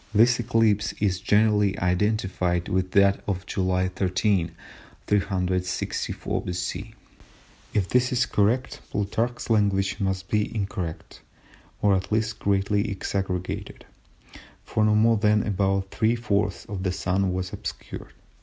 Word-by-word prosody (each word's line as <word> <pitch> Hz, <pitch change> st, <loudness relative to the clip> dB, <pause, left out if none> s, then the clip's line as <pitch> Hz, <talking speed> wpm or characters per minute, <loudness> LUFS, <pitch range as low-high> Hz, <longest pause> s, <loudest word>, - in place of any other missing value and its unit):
This 115 Hz, +3 st, +5 dB
eclipse 110 Hz, -3 st, +2 dB
is 95 Hz, -3 st, 0 dB
generally 105 Hz, -1 st, +3 dB
identified 90 Hz, -2 st, 0 dB
with 95 Hz, 0 st, 0 dB
that 100 Hz, 0 st, +5 dB
of 95 Hz, -2 st, -2 dB
July 95 Hz, -1 st, 0 dB
13, 95 Hz, -1 st, +1 dB, 0.6 s
364 90 Hz, -3 st, -1 dB
B.C. 90 Hz, +5 st, -4 dB, 0.8 s
If 95 Hz, -3 st, +2 dB
this 125 Hz, +4 st, +2 dB
is 125 Hz, +1 st, +2 dB
correct, 115 Hz, +3 st, 0 dB
Plutarch's 115 Hz, +4 st, -2 dB
language 100 Hz, -2 st, +2 dB
must 95 Hz, -2 st, -1 dB
be 105 Hz, +3 st, 0 dB
incorrect, 95 Hz, -5 st, -4 dB, 0.6 s
or 100 Hz, -1 st, +5 dB
at 95 Hz, +2 st, -3 dB
least 110 Hz, 0 st, 0 dB
greatly 100 Hz, +2 st, +1 dB
exaggerated, 95 Hz, -2 st, -3 dB, 0.8 s
for 110 Hz, -, 0 dB
no 105 Hz, 0 st, +4 dB
more 115 Hz, +1 st, +4 dB
than 105 Hz, 0 st, +3 dB
about 95 Hz, -1 st, 0 dB
three 110 Hz, +1 st, +2 dB
fourths 105 Hz, -4 st, -1 dB
of 100 Hz, -3 st, -5 dB
the 95 Hz, -1 st, 0 dB
Sun 95 Hz, +1 st, 0 dB
was 90 Hz, 0 st, -3 dB
obscured. -, -, -7 dB
100 Hz, 125 wpm, -25 LUFS, 95-110 Hz, 0.8 s, This